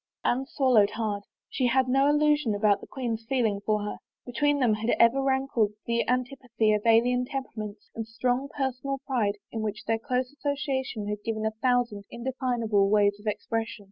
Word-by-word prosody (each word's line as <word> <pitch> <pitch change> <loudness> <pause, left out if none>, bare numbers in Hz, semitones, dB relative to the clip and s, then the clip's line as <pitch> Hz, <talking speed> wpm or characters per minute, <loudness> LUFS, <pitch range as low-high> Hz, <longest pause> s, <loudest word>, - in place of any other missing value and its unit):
Anne 265 +2 +1
swallowed 250 -8 +3
hard. 210 -3 -2 0.3
She 255 - 0
had 260 +2 +2
no 270 +2 +3
illusion 295 -6 +2
about 205 -1 +2
the - - -11
queen's 235 -4 -4
feeling 225 -7 +1
for 210 -1 0
her. 210 - -4 0.3
Between 285 +4 +1
them 245 -5 +3
had 220 +2 -2
ever 235 +4 +5
rankled 265 -5 +1
the 235 0 0
antipathy 245 -3 0
of 210 - +1
alien 245 +2 +4
temperaments, 220 -6 -6
and 225 -1 -5
strong 245 +4 -1
personal 270 -1 -2
pride 215 -7 0
to 225 - -4
v^hidi 215 -1 -4
their 225 0 0
close 250 0 -1
association 275 -7 -2
had 210 0 -4
given 220 -1 -2
a 220 - +1
thousand 245 -5 +1
indefinable 235 -5 0
ways 205 -1 +3
of 210 - -11
expression. 225 +2 -2
235 Hz, 170 wpm, -27 LUFS, 215-265 Hz, 0.3 s, ever